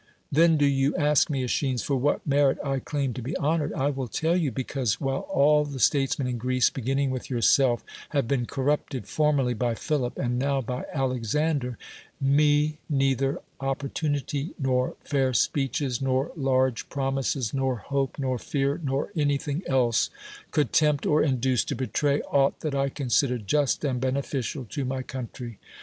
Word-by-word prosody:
Then 165 Hz, +2 st, +5 dB
do 145 Hz, -, +3 dB
you 140 Hz, 0 st, +2 dB
ask 150 Hz, 0 st, +3 dB
me, 135 Hz, -4 st, -1 dB
.l^schines, 125 Hz, -2 st, 0 dB
for 140 Hz, -, 0 dB
what 135 Hz, +3 st, 0 dB
merit 140 Hz, -1 st, +3 dB
I 135 Hz, -1 st, 0 dB
claim 140 Hz, -1 st, -2 dB
to 125 Hz, -, -6 dB
be 135 Hz, +9 st, -4 dB
honored? 155 Hz, 0 st, 0 dB
I 140 Hz, +2 st, 0 dB
will 135 Hz, -2 st, -4 dB
tell 160 Hz, +8 st, 0 dB
yon. 165 Hz, -7 st, +1 dB
Because, 130 Hz, -5 st, -1 dB
while 135 Hz, -1 st, -2 dB
all 150 Hz, +2 st, +4 dB
the 145 Hz, -2 st, -6 dB
statesmen 135 Hz, -1 st, +2 dB
in 125 Hz, -1 st, -3 dB
Greece, 130 Hz, +1 st, +2 dB
beginning 135 Hz, +2 st, -1 dB
with 130 Hz, -1 st, -5 dB
yourself, 120 Hz, 0 st, +3 dB, 0.3 s
have 140 Hz, -5 st, 0 dB
been 125 Hz, -2 st, 0 dB
corrupted 135 Hz, -3 st, -1 dB
formerly 145 Hz, -5 st, +2 dB
by 120 Hz, 0 st, -1 dB
Philip 130 Hz, -2 st, -2 dB
and 125 Hz, -1 st, -1 dB
now 140 Hz, +1 st, +1 dB
by 125 Hz, 0 st, -4 dB
Alexander, 130 Hz, 0 st, -1 dB, 0.4 s
me 150 Hz, +2 st, +3 dB
neither 135 Hz, -1 st, +1 dB, 0.2 s
opportunity, 140 Hz, +2 st, -2 dB
nor 130 Hz, -3 st, 0 dB
fair 135 Hz, -3 st, 0 dB
speeches, 135 Hz, -2 st, 0 dB
nor 135 Hz, +2 st, 0 dB
large 130 Hz, -4 st, +1 dB
promises, 135 Hz, -3 st, -1 dB
nor 135 Hz, -1 st, 0 dB
hope, 135 Hz, +4 st, -2 dB
nor 130 Hz, -3 st, -1 dB
fear, 140 Hz, +5 st, -1 dB
nor 140 Hz, +5 st, -1 dB
anything 145 Hz, 0 st, 0 dB
else 125 Hz, -3 st, +2 dB, 0.4 s
could 150 Hz, -6 st, 0 dB
tempt 150 Hz, -2 st, +3 dB
or 150 Hz, 0 st, +3 dB
induce 130 Hz, -3 st, +2 dB
to -, -, -3 dB
betray 140 Hz, +2 st, 0 dB
aught 140 Hz, -1 st, +1 dB
that 155 Hz, -3 st, -2 dB
I 140 Hz, 0 st, +1 dB
considered 125 Hz, -3 st, 0 dB
just 145 Hz, +7 st, +1 dB
and 130 Hz, -3 st, -1 dB
bene 130 Hz, 0 st, 0 dB
ficial 130 Hz, -1 st, -4 dB
to 140 Hz, -, -3 dB
my 130 Hz, 0 st, -2 dB
country. 125 Hz, -3 st, -7 dB
135 Hz, 165 wpm, -26 LUFS, 130-145 Hz, 0.4 s, Then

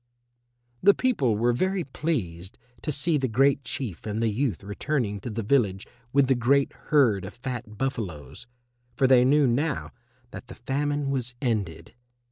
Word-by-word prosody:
The 200 Hz, +1 st, +6 dB
people 140 Hz, -, +1 dB
were 120 Hz, +2 st, +2 dB
very 185 Hz, +7 st, 0 dB
pleased 105 Hz, -, -4 dB, 0.2 s
to 155 Hz, -, -2 dB
see 150 Hz, +2 st, +3 dB
the 130 Hz, -, 0 dB
Great 135 Hz, +4 st, +2 dB
Chief 115 Hz, -6 st, -5 dB
and 105 Hz, +1 st, -2 dB
the 115 Hz, -1 st, +1 dB
youth 115 Hz, -4 st, -1 dB
returning 105 Hz, +1 st, -2 dB
to 110 Hz, -, -6 dB
the 115 Hz, 0 st, -4 dB
village 105 Hz, -5 st, +1 dB, 0.3 s
with 140 Hz, +1 st, +4 dB
the 135 Hz, -, +3 dB
great 135 Hz, +3 st, +2 dB, 0.2 s
herd 120 Hz, -10 st, +4 dB
of 95 Hz, -, -8 dB
fat 120 Hz, -3 st, -6 dB
buffaloes, 105 Hz, -, -4 dB, 0.5 s
for 130 Hz, -, +2 dB
they 130 Hz, -1 st, +6 dB
knew 145 Hz, +3 st, +4 dB
now 135 Hz, +4 st, 0 dB, 0.4 s
that 125 Hz, -, -9 dB
the 120 Hz, -, -10 dB
famine 145 Hz, +2 st, -2 dB
was 125 Hz, -2 st, -2 dB
ended. 110 Hz, -, -2 dB
125 Hz, 160 wpm, -26 LUFS, 110-140 Hz, 0.5 s, The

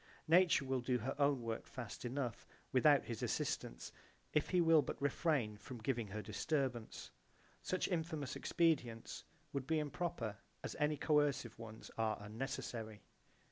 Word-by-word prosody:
Nature 170 Hz, -4 st, +5 dB
will 130 Hz, -1 st, 0 dB
do 125 Hz, +1 st, +1 dB
her 120 Hz, +3 st, -2 dB
own 140 Hz, -3 st, +3 dB
work 115 Hz, -1 st, -3 dB
fast 120 Hz, -1 st, -6 dB
enough 125 Hz, -1 st, -3 dB, 0.2 s
without -, -, +6 dB
his -, -, -4 dB
assistance -, -, -2 dB, 0.4 s
if 150 Hz, -, +2 dB
he 180 Hz, -, +3 dB
will 165 Hz, -2 st, +7 dB
but -, -, -4 dB
refrain 140 Hz, -6 st, +1 dB
from 125 Hz, +4 st, -8 dB
giving 115 Hz, -1 st, -1 dB
her 105 Hz, +2 st, -5 dB
disturbance. 125 Hz, +2 st, -2 dB, 0.5 s
Such 185 Hz, -, 0 dB
infamous 160 Hz, -6 st, -2 dB
expedients 130 Hz, -9 st, +1 dB, 0.3 s
would 140 Hz, -2 st, -2 dB
be 160 Hz, 0 st, +2 dB
improper 150 Hz, -7 st, -2 dB, 0.3 s
as -, -, -4 dB
any 150 Hz, 0 st, +2 dB
coercive 145 Hz, -7 st, +2 dB
ones 110 Hz, -1 st, -9 dB
are 110 Hz, -1 st, +1 dB
unnecessary. 110 Hz, 0 st, -5 dB
130 Hz, 140 wpm, -38 LUFS, 115-150 Hz, 0.5 s, will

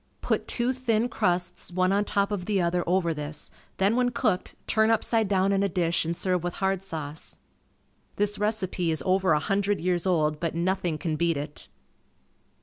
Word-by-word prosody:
Put -, -, -1 dB
two 245 Hz, +2 st, +1 dB
thin 245 Hz, -2 st, 0 dB
crusts 180 Hz, -4 st, 0 dB
one 185 Hz, +1 st, +1 dB
on 205 Hz, +1 st, +2 dB
top 200 Hz, 0 st, 0 dB
of 190 Hz, -4 st, -3 dB
the 205 Hz, -1 st, +1 dB
other 175 Hz, 0 st, +1 dB
over 175 Hz, -2 st, +2 dB
this, 150 Hz, 0 st, -4 dB, 0.3 s
then 195 Hz, +4 st, +2 dB
when 250 Hz, 0 st, +2 dB
cooked, 235 Hz, -6 st, -1 dB
turn 220 Hz, 0 st, +3 dB
upside 225 Hz, -1 st, +2 dB
down 195 Hz, 0 st, +2 dB
in 195 Hz, 0 st, +2 dB
a 200 Hz, -, +1 dB
dish 170 Hz, -1 st, 0 dB
and 170 Hz, +1 st, -2 dB
serve 180 Hz, -2 st, 0 dB
with 175 Hz, 0 st, -3 dB
hard 190 Hz, -1 st, 0 dB
sauce. 160 Hz, -5 st, -7 dB, 0.8 s
This 205 Hz, 0 st, 0 dB
recipe 200 Hz, -5 st, 0 dB
is 155 Hz, -4 st, +1 dB
over 185 Hz, -2 st, +3 dB
a 150 Hz, -, +3 dB
hundred 200 Hz, +4 st, 0 dB
years 180 Hz, 0 st, 0 dB
old 155 Hz, -4 st, +1 dB
but 165 Hz, -1 st, -2 dB
nothing 175 Hz, -2 st, 0 dB
can 155 Hz, 0 st, -2 dB
beat 170 Hz, -2 st, +1 dB
it. 145 Hz, +1 st, -7 dB
185 Hz, 185 wpm, -26 LUFS, 170-205 Hz, 0.8 s, turn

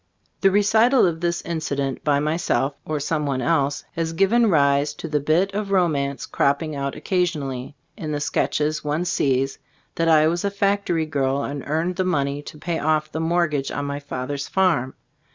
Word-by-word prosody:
The 195 Hz, -, +5 dB
recital 220 Hz, +6 st, +4 dB
of 165 Hz, -2 st, -1 dB
this 170 Hz, 0 st, -1 dB
incident 140 Hz, -5 st, -3 dB
by 145 Hz, -2 st, +2 dB
my 155 Hz, +2 st, 0 dB
self, 145 Hz, -4 st, 0 dB
or 155 Hz, -1 st, -2 dB
some 150 Hz, +1 st, -1 dB
one 135 Hz, -2 st, -1 dB
else, 140 Hz, +1 st, +1 dB
has 165 Hz, -1 st, -3 dB
given 220 Hz, +6 st, +3 dB
rise 145 Hz, -2 st, +3 dB
to 165 Hz, -, -6 dB
the 150 Hz, -1 st, 0 dB
bit 165 Hz, +7 st, +1 dB
of 205 Hz, 0 st, -3 dB
romance 150 Hz, -8 st, +1 dB
cropping 145 Hz, +2 st, 0 dB
out 140 Hz, 0 st, -3 dB
oc -, -, -11 dB
casionally, 145 Hz, -9 st, -1 dB, 0.2 s
in 155 Hz, -2 st, -5 dB
the 145 Hz, -, -1 dB
sketches 150 Hz, +1 st, 0 dB
one 150 Hz, +4 st, -1 dB
sees, 135 Hz, -5 st, 0 dB, 0.3 s
that 165 Hz, -, 0 dB
I 155 Hz, -1 st, +5 dB
was 170 Hz, +2 st, 0 dB
a 200 Hz, -, +1 dB
factory 200 Hz, -4 st, 0 dB
girl 140 Hz, -2 st, 0 dB
and 140 Hz, -1 st, -4 dB
earned 165 Hz, +4 st, -1 dB
the 185 Hz, -, +1 dB
money 145 Hz, -5 st, 0 dB
to 150 Hz, -, -10 dB
pay 165 Hz, +2 st, -3 dB
off 155 Hz, 0 st, 0 dB
the 160 Hz, -, -3 dB
mortgage 160 Hz, -4 st, 0 dB
on 145 Hz, -, -3 dB
my 140 Hz, 0 st, -3 dB
father's 140 Hz, 0 st, -4 dB
farm. 165 Hz, -9 st, +1 dB
155 Hz, 190 wpm, -23 LUFS, 140-175 Hz, 0.3 s, The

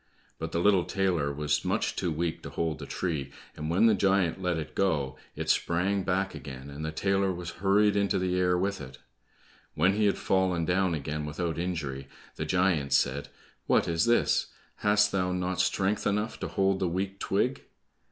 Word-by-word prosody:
But 80 Hz, 0 st, -4 dB
the -, -, -1 dB
little 95 Hz, -1 st, +4 dB
tailor 90 Hz, -7 st, 0 dB
was 75 Hz, +1 st, 0 dB
much -, -, 0 dB
too 90 Hz, -, -1 dB
weak 80 Hz, +1 st, -2 dB
to -, -, -7 dB
hold 80 Hz, -2 st, -2 dB
the -, -, -7 dB
tree, 80 Hz, -7 st, -3 dB, 0.2 s
and 75 Hz, +1 st, -4 dB
when 90 Hz, +7 st, +3 dB
the 115 Hz, -, +6 dB
giant 95 Hz, -2 st, +2 dB
let 90 Hz, -2 st, 0 dB
it 80 Hz, -2 st, -5 dB
go, 75 Hz, -9 st, 0 dB, 0.2 s
it -, -, -4 dB
sprang 95 Hz, +4 st, +1 dB
back 95 Hz, +1 st, -1 dB
again, 70 Hz, -2 st, -8 dB
and 70 Hz, +2 st, -7 dB
the 80 Hz, -, -2 dB
tailor 95 Hz, +3 st, +1 dB
was 85 Hz, -1 st, -5 dB
hurried 100 Hz, +1 st, +4 dB
into 100 Hz, -1 st, +2 dB
the 90 Hz, -1 st, 0 dB
air 90 Hz, -1 st, +2 dB
with 95 Hz, 0 st, -1 dB
it. 65 Hz, -1 st, -9 dB, 0.8 s
When 95 Hz, -, +3 dB
he 105 Hz, 0 st, +2 dB
had 100 Hz, -, +1 dB
fallen 95 Hz, -3 st, +1 dB
down 90 Hz, 0 st, +1 dB
again 75 Hz, +1 st, -4 dB
without 80 Hz, +1 st, -3 dB
injury, 80 Hz, -7 st, -3 dB, 0.3 s
the -, -, -3 dB
giant 90 Hz, -7 st, +1 dB
said, 70 Hz, +3 st, +1 dB, 0.4 s
"What -, -, +3 dB
is 85 Hz, +5 st, +1 dB
this? 120 Hz, 0 st, +2 dB, 0.3 s
Hast 105 Hz, 0 st, +3 dB
thou 90 Hz, -1 st, 0 dB
not 90 Hz, 0 st, 0 dB
strength 100 Hz, +2 st, 0 dB
enough 105 Hz, +2 st, -1 dB
to -, -, -3 dB
hold 95 Hz, 0 st, +1 dB
the 95 Hz, -, +1 dB
weak 95 Hz, +3 st, -3 dB
twig?" 125 Hz, +7 st, 0 dB
90 Hz, 190 wpm, -28 LUFS, 80-95 Hz, 0.8 s, the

